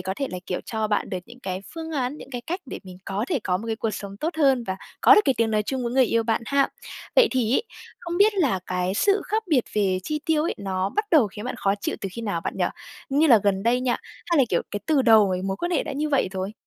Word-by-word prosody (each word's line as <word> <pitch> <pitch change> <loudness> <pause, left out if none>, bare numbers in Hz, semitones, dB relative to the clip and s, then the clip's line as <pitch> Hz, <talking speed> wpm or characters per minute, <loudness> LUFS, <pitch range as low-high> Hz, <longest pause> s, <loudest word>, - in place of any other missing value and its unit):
có 190 +1 -3
thể 275 - -1
là, 180 - -4
kiểu, 180 - -2
cho 220 -1 -2
bạn 210 -1 -1
được 185 - -2
những 240 +2 -14
cái 185 -5 -4
phương 325 0 -6
án, 265 0 -1
những - - -11
cái 245 -2 -4
cách 355 +9 -4
để - - -6
mình 185 -1 -10
có 195 +3 -2
thể 310 -7 +1
có 180 -1 +1
một 215 - -7
cái 225 -1 -2
cuộc 225 0 -1
sống 200 -1 -7
tốt 320 +9 -3
hơn 265 -5 +3
và 190 -2 -3 0.2
có - - +8
được - - +7
cái 270 - +3
tiếng 230 -1 +1
nói 215 -1 +2
chung 260 +4 -3
với 235 - -2
người 260 0 +5
yêu 230 -1 +1
bạn 225 0 0
ha. 280 0 +2 0.5
Vậy - - +7
thì 250 -2 +1
ấy, - - +2 0.4
không 340 0 -4
biết 415 +1 +5
là 285 - +2
cái 185 +1 -1
sự 400 - +2
khác 440 +1 -1
biệt 275 -8 +3
về 195 -3 +1
chi 300 +5 -3
tiêu 315 -2 +2
ấy, 335 - -1
nó 190 -1 -1
bắt 425 - -1
đầu 300 -9 +5
khiến 210 +2 -8
bạn 250 - -3
khó 195 0 +1
chịu - - -2
từ 195 - -3
khi 230 - -6
nào, 200 -6 -2
bạn 180 - -4
nhỉ? - - +1 0.4
Như 290 +3 +3
là 235 -7 +7
gần 195 -1 +2
đây 240 +3 +2
nha, 250 -1 +1 0.3
hay 340 -4 +2
là, 270 - +6
kiểu, 175 - +1
cái 205 - -4
từ 295 -4 +3
đầu 220 -4 +6
cái 185 0 -2
mối 195 0 -2
quan 345 - -3
hệ 335 - +1
đã - - -5
như 300 +2 -1
vậy 275 -9 +2
rồi? 190 +2 -3
235 Hz, 295 wpm, -24 LUFS, 195-290 Hz, 0.5 s, có